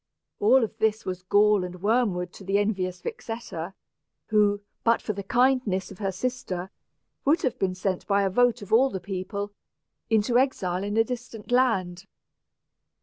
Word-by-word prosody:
All 240 +5 +5
of 220 - -3
this 220 0 +1
was 185 -1 -4
gall 205 +1 +4
and 180 0 -7
worm 225 -2 +2
wood 180 0 -4
to - - -12
the 195 +1 +1
envious 190 -3 -1
Vixetta, 195 -6 -6 0.5
who, 205 -2 +3 0.2
but 230 0 +4
for 215 - -3
the 200 - -5
kindness 240 -3 +1
of 190 - -11
her 195 -2 -1
sister, 190 -4 -4 0.5
would 300 +4 +2
have 255 - -1
been 185 -1 0
sent, 185 0 -2
by 200 -1 +3
a 195 - +2
vote 245 +1 +2
of 205 +2 -6
all 260 +4 +6
the 190 - -4
people, 200 +2 -4 0.6
into 225 +2 +3
exile 190 -9 0
in 205 +2 -2
a 225 - +6
distant 240 -2 -7
land. 195 -8 +1
205 Hz, 170 wpm, -26 LUFS, 185-235 Hz, 0.6 s, all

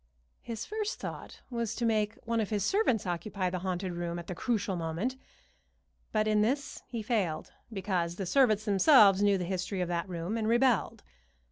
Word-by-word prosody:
His 230 -2 -5
first 430 +2 -3
thought - - -7
was 235 -2 -2
to 240 - -1
make 215 -2 +1
one 230 0 0
of 215 - -1
his 205 -2 0
servants 325 - +2
occupy 185 +1 -2
the 185 - -2
haunted 185 0 -3
room 170 0 -3
at 170 - -6
the 180 - -5
crucial 210 0 -1
moment; 170 +10 -2 1.0
but 215 -1 +1
in 215 -1 +3
this 280 +6 -1
he 235 -3 -4
failed, 195 -9 -1 0.2
because 185 -4 -1
the 195 - -4
servants 215 0 +3
themselves 205 -1 +6
knew 205 -1 +4
the 180 - -3
history 185 +1 -3
of 180 -1 -1
that 175 +1 -2
room 175 +5 -3
and 220 -1 -1
rebelled. 240 -2 +2
205 Hz, 180 wpm, -30 LUFS, 180-230 Hz, 1.0 s, themselves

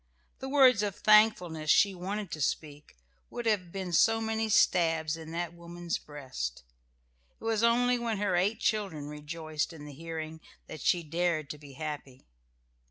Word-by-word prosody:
The 265 - -5
words 260 -6 +6
of 205 -2 -2
thankfulness 180 -8 +4
she 200 +4 +5
wanted 190 +1 -4
to 155 - -5
speak 145 - -3 0.3
would 240 - -6
have 195 -6 0
been 190 -2 -5
so 225 +8 +4
many 220 0 -1
stabs 165 -5 +3
in 160 -1 -9
that 170 0 -3
woman's 170 0 -5
breast. 130 - -6 0.8
It - - -17
was 225 -1 0
only 245 +1 +3
when 230 -2 -2
her 200 -2 0
eight 200 +5 +1
children 195 -9 -1
rejoiced 155 +2 -4
in 150 -2 -10
the 145 - -9
hearing 160 +1 -6 0.2
that 155 - -9
she 175 -1 +2
dared 165 -2 -1
to 150 - -9
be 145 -2 -13
happy. 145 -3 -7
170 Hz, 165 wpm, -30 LUFS, 155-215 Hz, 0.8 s, words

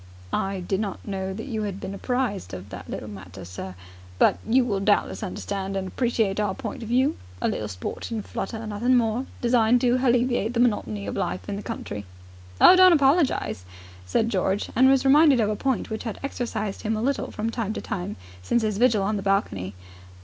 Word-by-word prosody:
"I 195 -1 -1
did 190 +2 -1
not 205 -1 -4
know 190 -1 -3
that 220 +5 -6
you 220 -6 -3
'ad 200 -2 -4
been 195 - -5
apprised 220 - -2
of 90 +2 -9
that - - -9
little 110 - -5
matter, 95 -2 -9
sir. 90 +1 -7 0.4
But - - +4
you 250 +2 +4
will 205 -5 0
doubtless 205 +3 +1
understand 195 -1 -4
and 190 -1 -3
appreciate 220 -3 0
our 205 -2 0
point - - -6
of 225 - -6
view. 260 +5 +2 0.2
A - - 0
little 105 - -2
sporting 155 - -5
flutter 220 +3 -5
nothing 220 +4 +1
more 235 +2 0
designed 240 0 +4
to 245 0 +3
halleviate 245 -2 +1
the - - +1
monotony 115 - +1
of 100 - -4
life 90 +1 -3
in - - -3
the 200 - -5
country." 105 - -5 0.6
"Oh, 370 - +9
don't 370 -1 +8
apologize," 280 - +2 0.4
said 220 - +1
George, 190 0 0
and 260 +3 +6
was 270 0 +3
reminded 285 -1 +6
of 215 -2 +2
a - - -1
point 265 0 -1
which 220 - -4
had 225 - -4
exercised 230 -7 -3
him 220 0 -1
a - - -2
little 275 +2 0
from 220 +2 -3
time 225 -3 -2
to - - -4
time 185 0 -4 0.3
since 235 - +1
his 215 -2 -1
vigil 230 -5 +4
on 210 +2 0
the - - -3
balcony. 100 - -1
215 Hz, 200 wpm, -25 LUFS, 195-245 Hz, 0.6 s, Oh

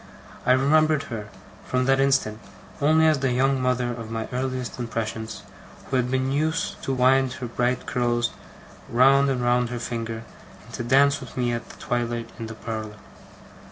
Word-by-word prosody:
I 125 - +7
remembered 155 +3 +3
her, 105 -2 -5 0.4
from 130 0 0
that 135 0 +3
instant, 135 -6 +2 0.4
only 155 +2 +4
as 155 -3 +4
the 135 -1 +1
young 135 +1 +2
mother 125 -1 +1
of 115 -2 -6
my 115 -1 -3
earliest 130 -1 -3
impressions, 110 -2 -4 0.5
who - - +1
had 125 -1 +1
been 130 +1 0
used 160 +4 -1
to - - -1
wind 130 0 +3
her 130 - -6
bright 120 +1 -1
curls 120 -1 0 0.6
round 135 +3 +5
and 125 -2 0
round 120 0 +2
her 125 - -4
finger, 115 -1 -4 0.4
and - - -15
to - - -4
dance 140 +3 +4
with - - -11
me 120 -1 +1
at 115 - -6
twilight 120 -1 -2
in 115 - -4
the 115 - -8
parlour. 110 -1 -5
125 Hz, 170 wpm, -24 LUFS, 115-135 Hz, 0.6 s, I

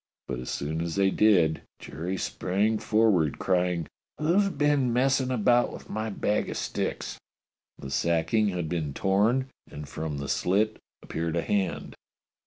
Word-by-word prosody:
But 65 - -3
as 60 - -6
soon 80 +3 -2
as 85 -1 -3
they 100 -1 +3
did 90 -8 +3 0.2
Jerry 90 +6 -5
sprang 105 +5 0
forward 105 -9 +2
crying: 90 -3 +1 0.2
" - - -37
^^'llo's 180 +6 +3
been 145 -7 +2
messing 130 +1 +2
about 120 0 +3
with - - -10
my 110 +1 -2
bag 105 0 -1
o' - - -3
sticks - - -3
.^^ - - -24 0.3
" - - -68
The 65 - -6
sacking 85 +8 +1
had 90 -4 -2
been 80 -4 -3
torn, 115 +8 +2 0.2
and 75 0 -8
from 75 0 -4
the 70 0 -4
slit 105 +8 +1 0.2
appeared 85 0 -3
a 85 - 0
hand. 95 0 -1
95 Hz, 165 wpm, -27 LUFS, 80-110 Hz, 0.3 s, they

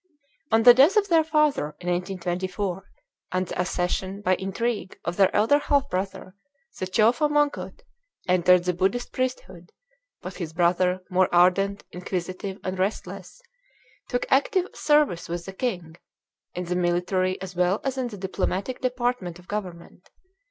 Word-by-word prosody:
On 225 0 +4
the 245 0 +10
death 285 - +5
of 410 -1 +2
their 325 -2 +5
father 300 - +1
(in 180 - -9
1824), 185 +1 -3 0.4
and 185 0 0
the 180 - -3
accession, 185 +2 -2
by 185 - +3
intrigue, 200 0 -3
of 170 - -2
their 195 -1 +4
elder 225 +8 +4
half 285 -1 +1
brother, 185 0 -4 0.5
the 185 - -2
Chowfa 230 - +3
Mongkut 295 +10 -1 0.5
entered 180 0 +4
the 180 0 0
Buddhist 195 +7 -1
priesthood; 190 -9 -4 0.5
but - - -7
his 165 -4 -5
brother, 180 +2 +2
more 185 0 +3
ardent, 190 +3 +3
inquisitive, 185 +2 -5
and 185 0 -4
restless, 205 - -4 0.7
took - - -1
active 385 -7 +2
service 295 - +2
with 170 0 -4
the 195 - -8
king, 180 -8 -4 0.6
in 180 - -3
the 180 +1 -2
military 180 +1 0
as 190 -1 -8
well 180 +3 +2
as 270 -1 -2
in 260 -2 -2
the 215 -4 -8
diplomatic 190 +4 -3
department 245 -8 -2
of 180 0 -18
government. 185 -3 -7
190 Hz, 150 wpm, -25 LUFS, 180-245 Hz, 0.7 s, the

